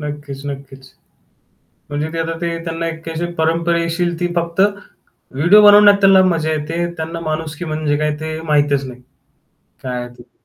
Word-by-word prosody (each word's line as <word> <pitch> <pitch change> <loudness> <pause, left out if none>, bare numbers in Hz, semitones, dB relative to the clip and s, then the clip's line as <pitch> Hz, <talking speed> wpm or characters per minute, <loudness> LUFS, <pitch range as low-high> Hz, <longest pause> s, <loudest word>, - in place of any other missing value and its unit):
नक्कीच, 145 -2 -7
नक्कीच. 135 -1 -9 1.0
म्हणजे 150 +2 -3
ते 165 - -3
आता 165 0 -2
ते 170 -1 -2
त्यांना 165 0 -3
एक 165 0 -6
अशी 165 +1 -3
परंपरेशील 170 +1 0
ती 175 - 0
फक्त, 170 +1 0 0.7
व्हिडिओ 175 +10 +5
बनवण्यात 205 0 +8
त्यांना 195 -1 +6
मजा 160 -1 -1
येते, 155 +3 -2
त्यांना 160 +1 -5
माणुसकी 160 0 -4
म्हणजे 155 -2 -1
काय 150 0 0
ते 155 0 -5
माहीतच 145 -3 +1
नाही, 125 -1 -10 0.8
काय 125 -2 -4
आहे 120 - -7
ते. 120 - -16
160 Hz, 155 wpm, -18 LUFS, 145-170 Hz, 1.0 s, बनवण्यात